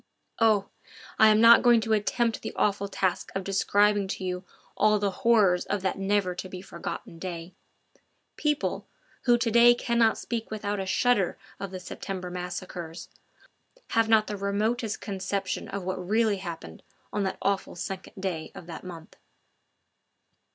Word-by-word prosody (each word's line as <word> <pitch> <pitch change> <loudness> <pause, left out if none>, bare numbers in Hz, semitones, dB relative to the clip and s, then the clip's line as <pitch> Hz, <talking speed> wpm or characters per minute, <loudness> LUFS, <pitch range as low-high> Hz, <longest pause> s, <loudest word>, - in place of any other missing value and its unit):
Oh! 215 -3 +3 0.5
I 220 - +8
am 215 0 +5
not 230 +1 +8
going 240 -2 +6
to 220 0 0
attempt 225 +2 0
the - - -6
awful 200 -1 +1
task 190 -2 -1
of 195 - -1
describing 205 +1 +2
to 190 - -4
you 180 0 -3 0.3
all 215 0 +4
the 200 -1 0
horrors 195 -4 +3
of 205 -1 -2
that 190 - -1
never 195 -1 +1
to 185 +1 -7
be 185 - -7
forgotten 170 -2 -7
day. 170 -1 -6 0.8
People, 300 -1 -1 0.4
who 240 -1 +5
to 235 -1 0
day 240 +1 +7
cannot 235 -2 +2
speak 230 -1 -4
without 205 -1 -3
a 190 - -3
shudder 205 -2 +2 0.2
of 195 - -4
the 185 0 -6
September 180 0 -6
massacres, 180 -2 -6 0.8
have 225 -1 +2
not 220 -1 +5
the 210 - -5
remotest 215 +3 -1
conception 195 -1 -3
of 200 -1 -5
what 185 0 -3
really 215 +2 +2
happened 170 - -8 0.3
on 205 - 0
that 190 -1 -2
awful 195 0 -1
second 190 +1 -6
day 180 -5 -3
of - - -9
that 170 -1 -8
month. 170 -3 -10
200 Hz, 160 wpm, -27 LUFS, 185-220 Hz, 0.8 s, I